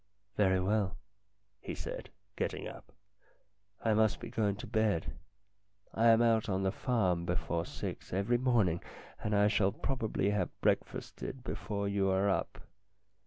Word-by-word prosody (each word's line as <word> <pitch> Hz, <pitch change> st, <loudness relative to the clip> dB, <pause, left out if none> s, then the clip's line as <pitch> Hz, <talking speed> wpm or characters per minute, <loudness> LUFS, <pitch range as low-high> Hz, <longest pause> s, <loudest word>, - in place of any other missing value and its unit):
"Very 95 Hz, -2 st, +3 dB
well," 95 Hz, 0 st, 0 dB, 0.6 s
he -, -, -6 dB
said, -, -, -6 dB, 0.3 s
getting -, -, -2 dB
up. -, -, -11 dB, 0.9 s
"I 110 Hz, -, +4 dB
must 110 Hz, 0 st, +3 dB
be -, -, -7 dB
going 105 Hz, -3 st, +1 dB
to 105 Hz, -, -8 dB
bed. 110 Hz, -6 st, 0 dB, 0.8 s
I 115 Hz, +1 st, +3 dB
am 115 Hz, +1 st, +6 dB
out 115 Hz, -2 st, +3 dB
on 95 Hz, 0 st, 0 dB
the 95 Hz, -, +2 dB
farm 95 Hz, -10 st, +1 dB
before 85 Hz, -1 st, -1 dB
six -, -, -6 dB
every 100 Hz, +6 st, +1 dB
morning, 110 Hz, -10 st, +2 dB, 0.4 s
and 105 Hz, 0 st, +1 dB
I 100 Hz, 0 st, +5 dB
shall 100 Hz, -2 st, +3 dB
probably 110 Hz, -6 st, -1 dB
have 100 Hz, -4 st, 0 dB
break -, -, +3 dB
fasted 130 Hz, -1 st, -7 dB
before 100 Hz, -5 st, -3 dB
you 100 Hz, -1 st, +1 dB
are 95 Hz, +1 st, +2 dB
up. 95 Hz, -, -1 dB
105 Hz, 150 wpm, -33 LUFS, 95-110 Hz, 0.9 s, am